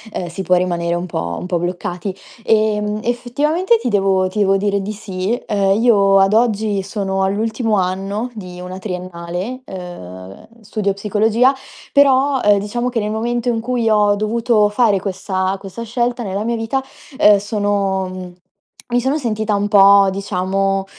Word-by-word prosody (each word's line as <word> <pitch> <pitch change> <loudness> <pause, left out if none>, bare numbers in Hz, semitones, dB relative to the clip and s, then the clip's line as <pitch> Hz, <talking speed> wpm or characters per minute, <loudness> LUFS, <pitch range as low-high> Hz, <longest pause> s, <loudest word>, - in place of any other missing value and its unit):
uhm, 180 - -2
si 170 +3 -6
può 180 0 +2
rimanere 175 -1 0
un 175 +1 -3
po' 85 - -4
un - - -6
po' 180 -2 -1
bloccati. 180 +2 -4 0.3
Ehm, 215 -1 +1
effettivamente 295 - +1
ti 250 - -2
devo 195 -3 +2
ti 210 - -4
devo 195 -1 +3
dire 200 0 0
di 205 +2 -4
sì. 190 -3 -6 0.2
Uhm, 200 0 +2
io 200 -5 +5
ad 195 +1 +3
oggi 215 -3 +1
sono 195 -1 -2
all'ultimo 220 +3 0
anno 195 +6 -2
di 180 -5 -9
una 180 +1 -7
triennale, 180 +4 -5
uhm, 95 - -9
studio 210 -1 -2
psicologia 215 +5 +2 0.4
però, 275 -1 +4
ehm, 205 -1 +5
diciamo 240 +5 -3
che 240 -2 -1
nel 210 0 -2
momento 240 +2 -1
in 230 - 0
cui 235 -1 -1
ho 210 -1 +3
dovuto 215 0 +1
fare 210 -3 +2
questa- 190 0 -2
questa 195 +4 -8
scelta 240 +1 -1
nella 200 0 -3
mia 235 0 0
vita, 225 +4 -1 0.4
uhm, 210 -8 +7
sono 205 -2 -1
mhmm, 185 -1 -8 0.6
mi 245 0 +1
sono 265 +4 0
sentita 220 -6 -1
un 205 0 0
po' 200 -1 +6
diciamo, 195 0 -1
205 Hz, 165 wpm, -18 LUFS, 190-225 Hz, 0.6 s, uhm